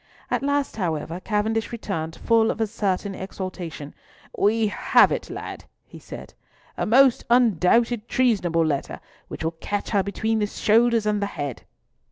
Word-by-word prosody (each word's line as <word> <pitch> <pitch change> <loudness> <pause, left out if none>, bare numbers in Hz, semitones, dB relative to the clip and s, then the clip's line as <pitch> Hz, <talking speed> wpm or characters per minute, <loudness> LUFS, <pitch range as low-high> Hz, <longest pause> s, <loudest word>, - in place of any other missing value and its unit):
At - - +1
last, 285 -3 -1
however, 165 -2 -2
Cavendish 220 +2 -1
returned 175 -9 -4
full 225 -1 +2
of - - -2
a 225 - +2
certain 200 -2 -2
exultation: 185 -6 -7 0.4
"We 220 +2 +2
have 205 - +4
it," - - -3 0.6
he - - -13
said,—"a - - -9
most 255 +2 +5
undoubted 235 0 +3
treasonable 185 -10 +2
letter, 145 -3 -2 0.3
which - - -7
will 160 - 0
catch 205 0 -3
her 200 -3 +3
between 220 +3 -1
the 210 - 0
shoulders 230 +2 +2
and 210 -1 0
the 200 - 0
head." 145 - -6
210 Hz, 145 wpm, -24 LUFS, 180-230 Hz, 0.6 s, most